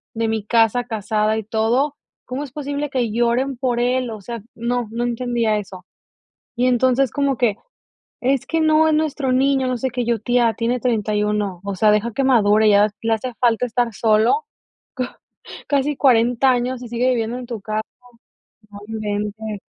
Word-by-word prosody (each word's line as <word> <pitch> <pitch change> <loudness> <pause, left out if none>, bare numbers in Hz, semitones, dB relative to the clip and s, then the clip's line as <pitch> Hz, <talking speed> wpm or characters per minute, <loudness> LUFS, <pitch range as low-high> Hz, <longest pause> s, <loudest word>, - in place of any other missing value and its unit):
de 225 0 0
mi 220 -2 -1
casa 230 +2 +2
casada 215 -1 -1
y 220 - -3
todo. 230 +7 0 0.3
¿Cómo 260 +3 -4
es 275 - -9
posible 285 +1 -4
que 245 -5 -1
lloren 240 +3 0
por 245 -1 -1
él? 250 0 0
O 215 -2 -7
sea, 235 +3 -6
no 235 0 -2
no 235 +1 -2
entendía 240 -2 0
eso. 190 -3 -8 0.7
Y 245 - +2
entonces, 255 +1 +2
como 280 -2 0
que: 220 -4 +1 0.7
"Es 265 0 +1
que 325 -1 0
no, 315 0 +4
es 310 - +2
nuestro 295 -4 0
niño, 265 0 +2
no 255 - -1
sé 260 +3 -2
qué". 245 -1 -3
Yo, 235 -1 0
tía: 240 +1 +2
"Tiene 240 +3 -1
31". 210 -4 -1
O 200 -1 -3
sea, 210 +2 +4
deja 210 +3 +1
que 270 +4 0
madure, 215 -4 +4
ya 205 0 +5
le 225 0 +1
hace 240 +3 -3
falta 240 0 +2
estar 240 -1 -1
solo. 225 - +2 0.5
Co 255 - -1 0.6
casi 285 +1 +1
40 245 0 +4
años 250 0 -1
y 245 - -7
sigue 240 +2 +1
viviendo 235 -1 -1
en 255 - -7
tu 235 -3 -5
casa, 215 +1 -2 0.9
no 205 - -10
inventes. 210 -1 -4
240 Hz, 180 wpm, -20 LUFS, 220-255 Hz, 0.9 s, ya